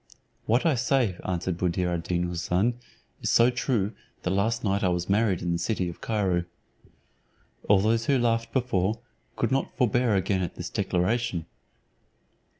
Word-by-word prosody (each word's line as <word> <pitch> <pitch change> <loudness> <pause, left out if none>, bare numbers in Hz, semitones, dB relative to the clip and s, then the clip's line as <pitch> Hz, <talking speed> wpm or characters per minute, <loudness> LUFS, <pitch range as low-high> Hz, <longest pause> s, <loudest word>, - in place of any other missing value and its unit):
"What 120 +7 +2
I 165 - +4
say," 130 -5 +1
answered 90 -1 -2
Buddir 90 0 0
ad 85 - -1
Deen 85 +1 -1
Houssun, 90 +6 0 0.5
"is - - -1
so 120 +2 +5
true 120 -4 0 0.3
that 90 - 0
last 110 +4 0
night 100 -1 0
I - - +3
was 90 0 -1
married 100 -3 +1
in 85 - -1
the 85 - 0
city 90 -1 -1
of 85 - -10
Cairo." 95 -6 0 1.2
All 100 -2 +6
those 115 +2 +1
who 140 - +4
laughed 115 -1 0
before, 115 -4 0 0.4
could 115 - -1
not 135 +1 -1
forbear 120 -3 +2
again 95 0 +1
at 90 - -3
this - - -6
declaration. 90 -1 0
100 Hz, 160 wpm, -27 LUFS, 90-115 Hz, 1.2 s, All